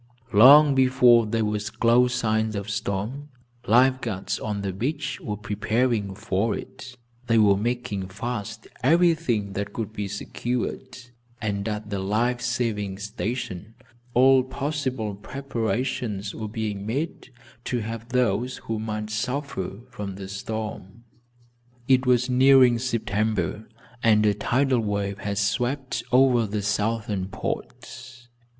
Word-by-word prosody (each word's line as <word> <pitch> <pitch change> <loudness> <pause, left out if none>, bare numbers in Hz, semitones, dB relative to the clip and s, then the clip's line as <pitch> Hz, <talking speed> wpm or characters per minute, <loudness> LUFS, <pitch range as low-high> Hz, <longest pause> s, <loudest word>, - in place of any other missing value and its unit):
Long 140 +7 +8
before 130 -3 +5
there 110 0 0
were 105 0 -1
close 115 +4 +2
signs 110 -2 0
of 100 +1 -4
storm, 110 +10 -3 0.4
life 130 +4 +4
guards, 100 -5 -3
on 105 -2 -3
the 95 -1 -2
beach, 135 - -3
were 105 -2 -4
preparing 105 0 -1
for 100 +2 -1
it. 125 -1 -10 0.3
They 115 - +3
were 105 -2 +5
making 105 -3 -2
fast 110 +2 -5 0.2
everything 155 - +2
that 100 +1 -4
could 110 -2 -4
be 105 -2 -3
secured 120 +5 -4 0.4
and 100 -2 -2
at 105 0 -5
the 100 - -1
life 115 +6 0
saving 115 -6 -2
station 105 0 -5 0.4
all 130 +1 +6
possible 130 -5 -3
preparations 115 -3 -3
were 110 - -5
being 105 -2 -3
made 135 +8 -4 0.4
to 120 -2 -1
help 115 +2 -6
those 125 -1 0
who 110 -1 -2
might 110 -1 -4
suffer 120 -4 -3
from 100 -4 -6
the 95 0 -7
storm. 105 +1 -6 0.8
It 130 -1 +3
was 125 0 +3
nearing 130 -1 +5
September 110 -4 -1 0.3
and 110 -2 +4
a 105 - +4
tidal 130 +5 +1
wave 100 -2 -2
had 100 0 -3
swept 125 +7 -1
over 125 -3 +4
the 105 0 -3
southern 105 -1 -1
ports. 125 +4 -7
110 Hz, 130 wpm, -25 LUFS, 105-125 Hz, 0.8 s, Long